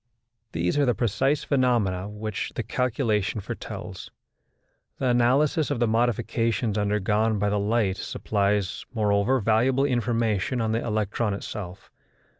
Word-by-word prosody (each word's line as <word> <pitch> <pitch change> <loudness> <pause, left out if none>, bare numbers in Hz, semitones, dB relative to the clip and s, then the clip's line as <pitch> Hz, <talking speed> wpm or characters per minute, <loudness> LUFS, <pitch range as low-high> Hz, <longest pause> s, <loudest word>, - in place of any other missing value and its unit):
These 90 +11 0
are 145 - +4
the 125 - +2
precise 135 +6 +1
phenomena 115 -9 +1
which 105 -1 -4
the - - -2
calculation 115 -5 0
foretells: 95 - -7 0.9
the - - -2
analysis 130 +5 +3
of 145 -5 -1
the 120 - +3
modifications 115 -1 0
undergone 105 +1 +1
by 105 +1 +1
the 105 - +1
light 105 -2 +1
supplies, 100 -2 -1
moreover, 105 +4 +2
valuable 120 +5 +2
information 120 -3 0
on 110 -1 0
the 115 +1 0
electron 105 -1 -1
itself. 100 -2 -7
110 Hz, 125 wpm, -25 LUFS, 105-120 Hz, 0.9 s, are